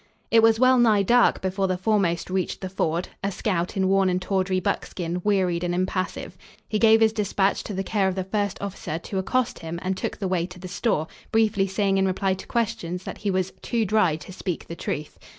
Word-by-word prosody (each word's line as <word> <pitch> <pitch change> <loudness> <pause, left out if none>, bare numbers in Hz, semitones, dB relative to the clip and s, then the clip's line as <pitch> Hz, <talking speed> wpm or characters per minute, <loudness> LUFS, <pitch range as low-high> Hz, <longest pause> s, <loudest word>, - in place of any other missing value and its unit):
It 230 - +6
was 225 0 +4
well 255 0 +5
nigh 215 -4 +4
dark 240 +4 +4
before 190 +1 0
the 185 -1 0
foremost 185 -3 0
reached 185 -2 -2
the 190 - -4
ford 175 -2 -1
a 200 - 0
scout 180 -2 -2
in 190 -1 +2
worn 195 0 +3
and 180 0 +1
tawdry 185 0 0
buckskin, 175 0 -2
wearied 185 -4 +1
and 175 0 -1
impassive. 185 0 -3 0.3
He 215 - -1
gave 225 0 +6
his 220 -1 +4
despatch 200 -2 +1
to 205 - -5
the 195 - -1
care 195 0 +1
of 190 - -1
the 190 - -1
first 200 0 -2
officer 195 -5 -4
to 190 +3 -4
accost 250 +6 0
him 165 +1 -5
and 190 +1 -1
took - - -4
the 195 - -2
way 180 -2 0
to 180 0 -12
the 185 +1 -8
store, 180 -3 0 0.3
briefly 215 -3 +2
saying 195 0 +1
in 190 - +2
reply 190 +1 0
to 185 - -8
questions, 180 -6 -2
that - - -7
he 205 - -2
was 185 -1 -1
"too 230 -2 0
dry 190 -6 +3
to 160 +4 -10
speak 180 -2 -4
the 170 - -6
truth." 150 -2 -5
190 Hz, 220 wpm, -24 LUFS, 180-210 Hz, 0.3 s, It